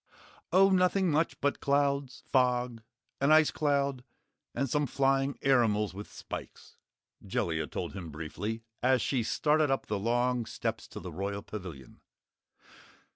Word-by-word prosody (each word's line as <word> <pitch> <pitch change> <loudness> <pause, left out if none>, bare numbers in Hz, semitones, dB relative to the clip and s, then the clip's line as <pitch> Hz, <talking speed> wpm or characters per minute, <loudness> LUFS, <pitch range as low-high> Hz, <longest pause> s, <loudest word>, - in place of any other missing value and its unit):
"Oh, 195 +2 +6
nothing 185 -1 +3
much 155 +2 +1
but 145 0 +1
clouds, 140 -2 0
fog, 125 -2 +1 0.4
an 140 - +2
icecloud, 145 -4 +3 0.5
and 140 - 0
some 145 +3 0
flying 135 +1 +1
airimals 110 -7 +3
with 100 +2 -8
spikes," - - -9 0.5
Jellia 80 -5 -1
told - - -5
him 90 -4 -7
briefly, 90 +9 -5 0.2
as 130 -1 +3
she 130 -4 +1
started 150 +6 +2
up 135 - 0
the 105 -1 -2
long 120 +2 +1
steps - - -3
to - - -8
the 90 - -7
Royal 100 +4 -4
Pavilion. 85 - -9
125 Hz, 130 wpm, -30 LUFS, 105-140 Hz, 0.5 s, Oh